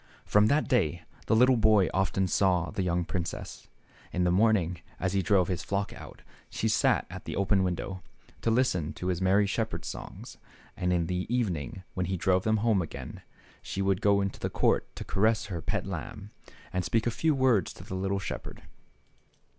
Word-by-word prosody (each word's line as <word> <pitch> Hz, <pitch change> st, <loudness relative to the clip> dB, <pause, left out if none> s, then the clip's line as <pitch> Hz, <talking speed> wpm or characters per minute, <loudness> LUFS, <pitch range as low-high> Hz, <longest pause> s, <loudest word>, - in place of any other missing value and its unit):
From 105 Hz, +1 st, +4 dB
that 145 Hz, +6 st, +2 dB
day 85 Hz, -, +1 dB, 0.2 s
the -, -, +3 dB
little 125 Hz, +2 st, +5 dB
boy 105 Hz, -3 st, +4 dB
often 95 Hz, 0 st, +1 dB
saw 90 Hz, -3 st, +2 dB
the -, -, -2 dB
young 90 Hz, -1 st, 0 dB
princess. 85 Hz, -2 st, -5 dB, 0.4 s
In 90 Hz, -, 0 dB
the 90 Hz, -, +3 dB
morning, 95 Hz, -3 st, +2 dB, 0.2 s
as 95 Hz, 0 st, -1 dB
he 100 Hz, -, +2 dB
drove 95 Hz, -2 st, +3 dB
his 90 Hz, -3 st, -2 dB
flock 100 Hz, 0 st, -2 dB
out, -, -, -12 dB, 0.3 s
she -, -, -2 dB
sat -, -, +2 dB
at -, -, -8 dB
the -, -, -4 dB
open 100 Hz, 0 st, +2 dB
window, 95 Hz, +1 st, -2 dB, 0.4 s
to -, -, +1 dB
lis 125 Hz, +3 st, +3 dB
ten 80 Hz, -4 st, -3 dB
to 90 Hz, -, -4 dB
his 90 Hz, 0 st, -1 dB
merry 95 Hz, +2 st, +4 dB
shepherd's 110 Hz, +2 st, -2 dB
songs, -, -, -8 dB, 0.4 s
and 90 Hz, 0 st, -1 dB
in 85 Hz, -2 st, +1 dB
the 90 Hz, +2 st, -2 dB
evening, 95 Hz, -, -2 dB
when 90 Hz, -1 st, -2 dB
he 95 Hz, 0 st, -1 dB
drove 95 Hz, +1 st, +2 dB
them 110 Hz, 0 st, +3 dB
home 110 Hz, -5 st, +3 dB
again, 80 Hz, -, -7 dB, 0.4 s
she 95 Hz, -, -3 dB
would 95 Hz, -1 st, +1 dB
go 100 Hz, -1 st, +4 dB
into 100 Hz, -1 st, -3 dB
the -, -, -2 dB
court -, -, +1 dB
to -, -, -6 dB
caress 110 Hz, +2 st, +1 dB
her 85 Hz, -, -3 dB
pet -, -, -2 dB
lamb, 105 Hz, 0 st, -6 dB, 0.4 s
and 90 Hz, -, 0 dB
speak 115 Hz, +4 st, 0 dB
a 120 Hz, -, +1 dB
few 160 Hz, +7 st, +1 dB
kind 135 Hz, -, -3 dB
words 120 Hz, -9 st, +3 dB
to -, -, -12 dB
the -, -, -8 dB
little 95 Hz, +1 st, -1 dB
shepherd. 95 Hz, -, -6 dB
95 Hz, 200 wpm, -29 LUFS, 90-110 Hz, 0.4 s, little